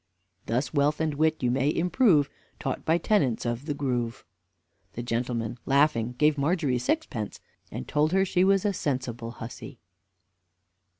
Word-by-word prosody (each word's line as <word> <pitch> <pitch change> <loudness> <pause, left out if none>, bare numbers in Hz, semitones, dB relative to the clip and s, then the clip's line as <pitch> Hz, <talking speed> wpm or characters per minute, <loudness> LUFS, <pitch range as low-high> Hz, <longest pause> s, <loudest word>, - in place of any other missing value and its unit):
"Thus 125 +5 -1
wealth 145 +1 +2
and 160 -1 0
wit 155 0 +1
you 120 - +2
may 135 +3 +2
improve. 175 - +3 0.3
Taught - - -4
by 165 +1 +3
tenants 150 - +1
of 120 +5 -3
the 145 - -1
grove." 125 -4 -2 0.7
The 120 - -5
gentleman, 115 -1 -2
laughing, 135 -4 +3
gave 150 0 +3
Margery 145 -4 +1
sixpence, 115 -3 -2 0.3
and 65 - -6
told 150 +1 +2
her 190 +1 +3
she 180 -1 +2
was 195 +1 +3
a 205 - +2
sensible 125 -7 -3
hussy. 115 0 -9
140 Hz, 145 wpm, -27 LUFS, 120-160 Hz, 0.7 s, improve